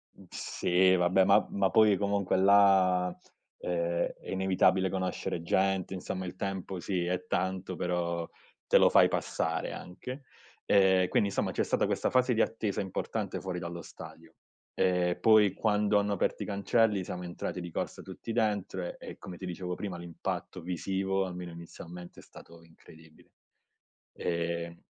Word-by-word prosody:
Uhm, - - -16
sì 95 +1 +2
vabbè, 90 +2 +4
ma 100 +1 +5
ma 100 -1 +1
poi 105 -2 +5
comunque 100 -2 0
là, 95 -2 +5 0.5
uhm, - - -5
è 85 -1 -1 0.2
inevitabile 95 0 +2
conoscere 95 -2 -3
gente, 95 +2 0
insomma 95 0 -4
il 90 - -7
tempo 95 -1 -4
sì 90 0 -2
è 90 0 -2
tanto, 95 0 -2
però 85 -1 -2 0.4
te - - +5
lo - - +6
fai - - +6
passare - - -2
anche. 125 +10 -8 0.4
Ehm, 95 -2 +4
quindi 100 - +2
insomma - - -1
c'è - - 0
stata - - +1
questa - - 0
fase 125 0 +3
di 115 - +2
attesa 105 -3 -1
importante 95 -2 -3
fuori 90 -2 -4
dallo 85 0 -6
stadio. - - -12 0.4
Ehm, 90 -1 +1
poi 110 -3 +5
quando 105 0 +2
hanno 100 0 0
aperto 100 - -1
i - - -6
cancelli 100 0 +1
siamo 90 0 -6
entrati 90 +1 -5
di 85 - -6
corsa - - -4
tutti 115 - -8
dentro, 100 -5 -1
e - - -9
come 90 -2 -9
ti 95 - -7
dicevo 90 0 -4
prima 95 -4 -5
l'impatto 85 +1 -5
visivo, 95 +2 -1
almeno 90 -1 -6
inizialmente, 85 +1 -10
è - - -13
stato 85 0 -15
incredibile. 80 -1 -19 0.9
Ehm, 85 0 -3
95 Hz, 155 wpm, -30 LUFS, 90-100 Hz, 0.9 s, lo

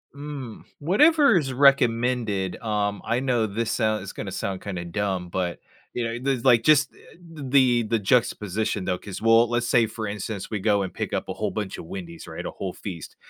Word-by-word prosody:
Mm, 140 -5 -7 0.2
whatever 280 - +5
is 135 -5 -1
recommended. 120 -7 +2
Um, 105 -2 -1
I 115 +2 +1
know 125 -4 +1
this 110 +2 -2
sound 110 -3 0
is 95 - -7
gonna - - -6
sound 95 -2 -4
kinda 90 -4 -5
dumb, 95 0 -2
but, 90 -1 -2 0.3
you 120 - -2
know, 115 0 -3
there's 130 -2 -1
like, 120 -3 +5
just 150 +1 +4
eh - - -20 0.2
the 135 -7 +2
the 115 +1 0
juxtaposition 105 -2 0
though, 90 -1 0
'cause 95 0 -8
we'll 115 +1 +5
let's 120 0 0
say, 120 -1 +4
for 110 0 -5
instance, 100 -1 -5
we 105 - -2
go 100 0 +2
and 95 - -4
pick - - -4
up - - -2
a - - -2
whole 105 -2 -2
bunch 105 0 -4
of - - -8
Wendy's, 85 -1 -8
right, - - -7
a - - -2
whole 95 -2 -5
feast. 85 -6 -8
115 Hz, 205 wpm, -25 LUFS, 100-125 Hz, 0.3 s, whatever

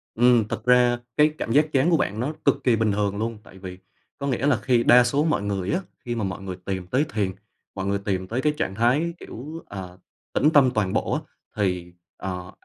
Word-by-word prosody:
Ừm. 120 -2 +4
Thực - - -5
ra 125 -1 +4 0.2
cái 150 +1 +5
cảm 115 - -3
giác 150 +5 +4
chán 140 +5 +3
của 165 - +4
bạn 105 -5 -1
nó 135 +6 -1
cực 140 - +2
kỳ 125 -3 +4
bình 110 -1 +1
thường 100 0 -1
luôn. 115 +1 -3
Tại 95 - -15
vì 90 -1 -8 0.4
có 140 - -4
nghĩa 135 +1 0
là 140 -5 +3
khi 125 -3 +2
đa 125 +1 +7
số 140 +4 +1
mọi 155 -9 +1
người 100 0 -2
á, 180 - +1 0.3
khi 120 -1 -2
mà 115 - -2
mọi 95 0 -4
người 95 -2 -6
tìm 95 -2 -3
tới 130 +10 +1
thiền, 100 -4 0 0.4
mọi 95 -1 -3
người 100 0 0
tìm 95 -2 -1
tới 120 +6 -2
cái 150 +2 +2
trạng 95 - -2
thái, 130 +10 +2
kiểu, 155 +8 -8
ờ, 95 -2 -8 0.4
tĩnh 150 - +4
tâm 135 -4 +6
toàn 100 -3 0
bộ - - 0
á, - - -1 0.3
thì, 90 -4 -1 0.2
ờ, 90 -1 -5
115 Hz, 235 wpm, -24 LUFS, 95-130 Hz, 0.4 s, đa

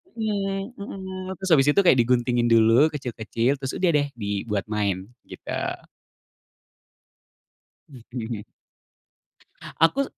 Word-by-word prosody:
Mmm, 200 0 -3
mhm, 190 -1 -6
terus 190 -1 -4
abis 140 -2 +5
itu 200 - +6
kayak 135 -8 +5
diguntingin 120 0 +2
dulu 115 +5 +5
kecil-kecil 125 -2 -2
terus 135 0 -4
udah 185 -2 +2
deh 145 -2 +2
dibuat 100 -1 -2
main, 100 -1 -1 0.2
gitu. - - -9 2.4
Mhm. 120 -4 -7 1.4
Aku 270 +12 +4
130 Hz, 100 wpm, -24 LUFS, 115-185 Hz, 2.4 s, itu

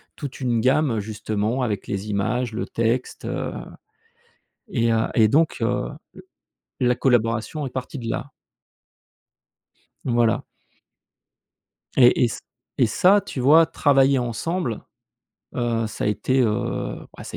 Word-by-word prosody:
toute 140 -2 -7
une 120 -3 0
gamme, 130 -1 +2
justement, 105 +3 -2
avec 105 -5 -2
les 100 +2 -4
images, 115 +4 -1
le 110 - -3
texte, 115 +2 -2
heu, - - -3 1.2
et 115 - +1
heu 110 0 +2
et 110 -2 +5
donc 155 +8 +2
heu, 115 - 0 0.9
l 125 - +2
la 125 - +3
collaboration 120 +3 0
est - - -4
partie 130 +3 -6
de 115 - -6
là. 135 +4 -4 1.7
Voilà 120 -3 +1 1.5
et 125 -1 +6
et - - +2
ç - - -6 0.4
et - - +6
ça, 195 +3 +4
tu 190 -9 -6
vois, 155 +6 +6
travailler 135 -3 +3
ensemble, 120 - -3 0.7
heu, 115 -2 0
ça - - -6
a - - +2
été, 105 +6 +1
heu, 105 -4 -1 0.2
bah, - - -9
ça - - -8
120 Hz, 135 wpm, -23 LUFS, 110-135 Hz, 1.7 s, et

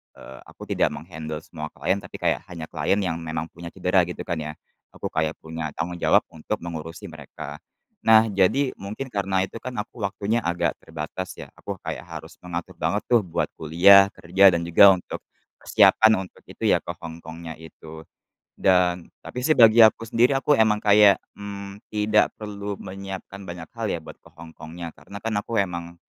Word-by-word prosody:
eee, 65 0 -12
aku - - -12
tidak - - 0
meng-handle 80 -1 -7
semua 75 -2 -7
klien, 95 +2 0
tapi - - -12
kayak - - 0
hanya 80 -3 -8
klien 75 +4 +1
yang 85 -2 -2
memang 80 0 -5
punya 85 0 -10
cedera, 90 +1 +1
gitu 90 - -6
kan, 85 -3 -3
ya. 75 0 -4 0.4
Aku - - -5
kayak 80 0 -1
punya 80 -2 -5
tanggung 85 +2 -4
jawab - - +4
untuk 80 +7 -4
mengurusi 80 -1 -7
mereka. - - -9 0.4
Nah, 110 -1 +5
jadi 100 +9 +2
mungkin 110 +7 -6
karena 95 -2 0
itu 95 +4 -7
kan, 125 +2 -7
aku 105 +2 -6
waktunya 105 +3 -1
agak 85 -5 0
terbatas, 80 +3 -6
ya. - - -10
Aku - - -5
kayak - - -6
harus - - -10
mengatur 85 -1 -7
banget - - 0
tuh, 120 - +7
buat 85 - -2
kuliah, 95 +5 +7
kerja, 95 +2 +5
dan 85 - -1
juga 95 +3 +7
untuk, 90 - -7 0.5
persiapan 110 0 +5 0.2
untuk - - -23
itu - - -2
ya, - - +5
ke - - -6
Hong 80 -1 -7
Kongnya 80 0 -8
itu. 80 0 -12 0.5
Dan 90 -2 +2 0.2
tapi 125 +1 -4
sih 155 - +4
bagi 115 -3 +6
aku 110 0 +7
sendiri, 115 +4 +2
aku 140 +2 +2
emang 105 -1 +3
kayak, 105 -1 +6 0.2
mmm, 100 -1 -7
tidak 105 0 +2
perlu 105 -1 -6
menyiapkan 95 0 -8
banyak 85 -2 -8
hal 115 -1 -4
ya, 85 -6 -2
buat - - -12
ke - - -30
Hong 85 0 -11
Kongnya, 85 +1 -7
karena 100 +4 -12
kan, 115 -1 -2
aku 115 - -5
emang, 85 -2 -6
95 Hz, 185 wpm, -24 LUFS, 80-105 Hz, 0.5 s, tuh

